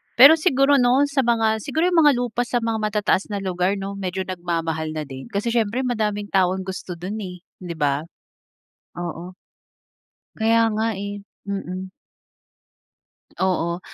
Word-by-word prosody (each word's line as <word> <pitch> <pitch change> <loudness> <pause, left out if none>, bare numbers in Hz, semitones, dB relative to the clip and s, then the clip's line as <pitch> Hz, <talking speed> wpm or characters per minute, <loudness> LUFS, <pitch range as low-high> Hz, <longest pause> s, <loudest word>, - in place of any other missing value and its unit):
Pero 285 +6 +9
siguro 280 -3 +4
'no 250 +3 +4
sa 280 - 0
mga 225 -2 +2
siguro 320 - 0
yung 345 - +4
mga 290 -2 +6
lupa 245 0 -1
sa 245 -2 -1
mga 225 -1 -1
matataas 210 -2 0
na 205 -2 -4
lugar 185 +1 0
'no 195 0 -5
medyo 190 0 -3
nagmamahal 165 -3 -3
na 155 - -2
din. 135 -2 -9
Kasi, 205 +4 -2
siyempre 230 +1 0
madaming 210 -4 -1
taong 190 0 +2
gusto 185 -1 -6
do'n 185 +5 -5
eh, 180 -3 -6 0.2
'di 175 -2 -6
ba. 145 -1 0 1.0
Oo. 175 +1 -5 1.0
Kaya 225 +1 +3
nga 220 0 0
eh. 205 0 -5 0.3
Mm. 190 -1 -4 1.5
Oo. 175 -2 0
200 Hz, 145 wpm, -22 LUFS, 180-230 Hz, 1.5 s, Pero